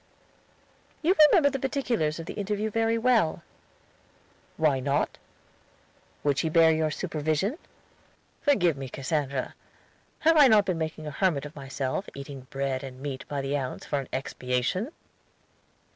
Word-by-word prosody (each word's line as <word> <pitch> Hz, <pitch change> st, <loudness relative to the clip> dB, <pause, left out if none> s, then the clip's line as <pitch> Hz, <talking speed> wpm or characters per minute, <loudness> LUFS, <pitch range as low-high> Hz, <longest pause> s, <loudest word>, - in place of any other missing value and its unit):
"You 360 Hz, +5 st, +4 dB
remember 285 Hz, -4 st, +5 dB
the 270 Hz, -, -3 dB
particulars 245 Hz, -, -1 dB
of 165 Hz, -, -6 dB
the -, -, -6 dB
interview 210 Hz, +1 st, -2 dB
very 225 Hz, +1 st, +1 dB
well." 225 Hz, -8 st, +2 dB, 1.1 s
"Why 150 Hz, -4 st, +2 dB
not?" 140 Hz, +2 st, -1 dB, 1.0 s
"Would 145 Hz, -1 st, +2 dB
she 160 Hz, -, 0 dB
bear 165 Hz, 0 st, +6 dB
your 155 Hz, 0 st, +1 dB
supervision?" 160 Hz, -, -1 dB, 0.8 s
"Forgive 180 Hz, -, +3 dB
me, 135 Hz, -1 st, -6 dB
Cassandra. 140 Hz, -1 st, -2 dB, 0.7 s
Have 325 Hz, +1 st, +5 dB
I 290 Hz, -3 st, +9 dB
not 215 Hz, -4 st, +5 dB
been 180 Hz, -4 st, -1 dB
making 155 Hz, -1 st, -4 dB
a 150 Hz, -, -4 dB
hermit 150 Hz, -2 st, 0 dB
of 150 Hz, -, -9 dB
myself, 135 Hz, +5 st, -3 dB
eating 140 Hz, -1 st, -8 dB
bread 135 Hz, -1 st, -2 dB
and 130 Hz, -1 st, -8 dB
meat 135 Hz, -1 st, -5 dB
by 145 Hz, -1 st, -3 dB
the 135 Hz, +1 st, -2 dB
ounce, 130 Hz, -3 st, -4 dB
for 145 Hz, -, -1 dB
an 135 Hz, -, -7 dB
expiation?" 130 Hz, -, -2 dB
155 Hz, 145 wpm, -27 LUFS, 140-210 Hz, 1.1 s, I